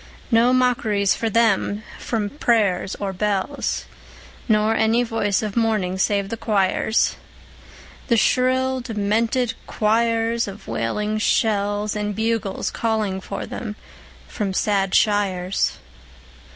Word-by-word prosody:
No 235 +2 +5
mockeries 240 -6 +2
for 225 - -2
them; 215 -1 +1 0.3
no 220 -3 0
prayers 200 -6 +1
nor 195 -1 -3
bells, 205 +7 -1 0.6
Nor 215 0 +3
any 225 +2 +3
voice 220 -3 0
of 210 -2 -4
mourning 215 -5 0
save 200 0 +1
the 230 - -4
choirs, 210 0 +1 0.9
The 235 -3 +3
shrill, 260 +2 +2
demented 225 +1 0
choirs 230 +1 +1
of 200 +1 -9
wailing 210 - -2
shells; 205 -1 +1
And 210 -1 -2
bugles 220 -2 -1
calling 215 -4 -1
for 200 - -5
them 215 -3 -6 0.5
from 195 -4 -3
sad 195 -2 +1
shires. 195 -3 +1
215 Hz, 110 wpm, -22 LUFS, 200-230 Hz, 0.9 s, No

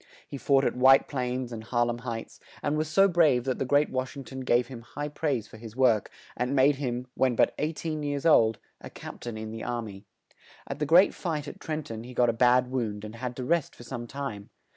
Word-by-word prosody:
He 140 - -7
fought 135 0 +3
at - - 0
White 130 +2 +6
Plains 125 -2 -3
and 110 -2 -6
Har 120 +1 +1
lem 120 0 -3
Heights, 115 -2 -6 0.2
and 145 - 0
was 155 +1 0
so 195 +6 +5
brave 155 -9 +3
that 130 0 -2
the - - 0
great 145 +3 +2
Wash 130 +1 -3
ing 135 - -6
ton 130 0 -8
gave 125 -1 +2
him 125 -3 -9
high 145 +5 -6
praise 140 -7 -2
for - - -13
his 115 0 -10
work, 125 -5 +3 0.3
and 125 +3 -1
made 135 +1 +4
him, 125 -3 -3
when 130 -2 +1
but - - +3
eight 155 +2 -3
een 155 -2 -2
years 145 0 -3
old, 115 -9 +5 0.3
a - - -7
cap - - -10
tain 120 -2 -6
in 110 0 -6
the 115 0 -6
ar 120 -1 -2
my. 100 -3 -9 0.6
At 140 - -6
the 150 - -1
great 175 +5 +6
fight 155 -5 -3
at - - -8
Tren 155 -2 -4
ton 115 0 -7
he 125 +1 -10
got 120 -1 +4
a - - +2
bad 125 +2 +3
wound 110 -5 -2
and 110 +2 -9
had 125 0 -4
to 130 - -5
rest 165 +3 0
for - - -12
some 120 -1 -6
time. 125 -7 -6
130 Hz, 250 wpm, -28 LUFS, 120-145 Hz, 0.6 s, White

